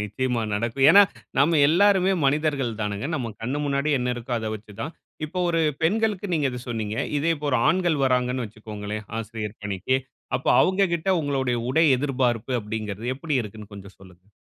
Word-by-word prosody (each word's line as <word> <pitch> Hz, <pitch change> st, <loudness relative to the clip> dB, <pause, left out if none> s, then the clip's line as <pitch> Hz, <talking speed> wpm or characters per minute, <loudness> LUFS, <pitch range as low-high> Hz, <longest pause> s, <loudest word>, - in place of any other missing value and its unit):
நிச்சயமா 115 Hz, +3 st, -1 dB
நடக்கும். 115 Hz, +6 st, +1 dB
ஏன்னா, 205 Hz, +1 st, +9 dB, 0.4 s
நாம் 155 Hz, +5 st, +4 dB
எல்லோருமே 195 Hz, +2 st, +4 dB
மனிதர்கள் 145 Hz, -4 st, +1 dB
தானுங்க. 105 Hz, +3 st, -2 dB
நம்ம 120 Hz, -7 st, -3 dB
கண்ணு 130 Hz, +5 st, -2 dB
முன்னாடி 140 Hz, +1 st, 0 dB
என்ன 125 Hz, 0 st, -1 dB
இருக்கோ, 120 Hz, +1 st, -6 dB
அதை 110 Hz, -1 st, -4 dB
வச்சு 105 Hz, 0 st, -11 dB
தான். 155 Hz, +3 st, -4 dB, 0.3 s
இப்போ, 180 Hz, +4 st, -6 dB
ஒரு 165 Hz, -1 st, +1 dB, 0.2 s
பெண்களுக்கு 205 Hz, +2 st, +1 dB
நீங்க 145 Hz, -4 st, +1 dB
இதை 125 Hz, -1 st, -6 dB
சொன்னீங்க. 110 Hz, -2 st, -3 dB, 0.2 s
இதே 165 Hz, +3 st, +2 dB
இப்போ, 145 Hz, 0 st, -5 dB
ஒரு 130 Hz, -, +2 dB
ஆண்கள் 170 Hz, -3 st, +2 dB
வர்றாங்கனு 125 Hz, -1 st, +1 dB
வச்சுக்கோங்களேன். 105 Hz, 0 st, -7 dB
ஆசிரியர் 110 Hz, -1 st, -6 dB
பணிக்கு, 105 Hz, +6 st, 0 dB, 0.4 s
அப்போ, 130 Hz, -, 0 dB
அவங்ககிட்ட 185 Hz, -2 st, +1 dB
உங்களுடைய 135 Hz, -4 st, -1 dB
உடை 160 Hz, +4 st, +4 dB
எதிர்பார்ப்பு, 125 Hz, -3 st, 0 dB
அப்படிங்கிறது 110 Hz, +2 st, -4 dB
எப்படி 150 Hz, -1 st, -2 dB
இருக்குன்னு 105 Hz, 0 st, -10 dB
கொஞ்சம் 100 Hz, -1 st, -12 dB
சொல்லுங்க. 95 Hz, -1 st, -17 dB
125 Hz, 160 wpm, -24 LUFS, 110-155 Hz, 0.4 s, ஏன்னா